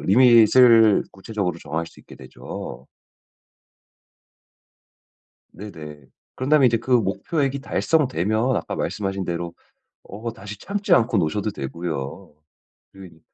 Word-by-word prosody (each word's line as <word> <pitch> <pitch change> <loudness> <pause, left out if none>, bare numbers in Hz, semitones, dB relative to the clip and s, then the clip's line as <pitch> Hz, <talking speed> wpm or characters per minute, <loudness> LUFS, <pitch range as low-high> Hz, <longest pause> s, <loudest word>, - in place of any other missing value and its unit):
리밋을 115 0 +6
구체적으로 95 -3 -4
정할 80 +1 -4
수 - - -16
있게 - - -15
되죠. 65 -2 -9 2.7
네네. 75 -8 -10 0.3
그런 130 - -4
다음에 150 -4 +6
이제 120 -1 +3
그 120 - -9
목표액이 130 - 0
달성되면 125 - 0
아까 - - -4
말씀하신 95 -2 -3
대로 85 0 -4 0.5
어 110 +4 -7
다시 100 -1 -10
참지 200 - -3
않고 120 -5 +2
노셔도 100 +6 -1
되고요. 75 -3 -6 0.6
그리 90 -4 -14
105 Hz, 250 characters per minute, -22 LUFS, 85-125 Hz, 2.7 s, 리밋을